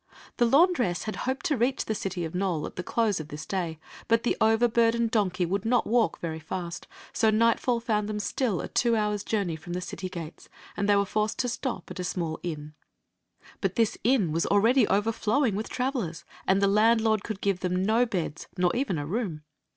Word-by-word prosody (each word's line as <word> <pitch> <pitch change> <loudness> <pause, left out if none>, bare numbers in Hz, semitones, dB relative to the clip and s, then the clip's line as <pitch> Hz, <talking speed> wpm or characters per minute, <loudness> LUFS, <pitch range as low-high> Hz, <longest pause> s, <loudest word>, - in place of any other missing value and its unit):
The 240 - +4
laundress 270 - +3
had 215 - -4
hoped 260 0 -2
to 300 - +2
reach 250 +3 +1
the 220 - -1
city 190 -4 -3
of 160 - -6
Nole 180 -4 -1
at - - -8
the - - -3
close 210 0 0
of 155 - -6
this 150 0 -7
day; 175 -5 -2 0.3
but 230 0 +3
the - - +1
overburdened 230 0 +3
donkey 185 -5 +1
would 195 +3 -1
not 240 +2 +2
walk 230 -6 +2
very 160 -2 -4
fast, 170 +2 -6 0.3
so 220 - +3
nightfall 230 +2 +2
found 215 -3 -1
them 210 - -2
still 210 - -1
a - - -5
two 235 -1 +2
hours' 210 -2 0
journey 200 -6 -1
from 160 +2 -8
the 180 - -1
city 185 +1 -6
gates, 170 -3 -8 0.3
and 200 +1 -1
they 205 - +6
were 200 0 +3
forced 215 +2 -1
to 250 - 0
stop 245 -3 -4
at 185 - -7
a - - -2
small 170 -3 -3
inn. 150 -3 -5 0.9
But - - -1
this 230 -3 +2
inn 225 - +3
was 165 +2 0
already 225 +4 +4
overflowing 220 +4 +1
with 215 +3 -3
travel 255 -3 -1
ers, 165 +1 -9 0.2
and 195 +1 +3
the - - +5
landlord 220 +1 +3
could 215 -4 -5
give 200 -3 0
them 180 +1 0
no 230 +4 +3
beds, 170 -7 -3
nor 180 -1 +2
even 240 - 0
a 145 - -3
room. 175 -4 -3
205 Hz, 210 wpm, -27 LUFS, 180-230 Hz, 0.9 s, they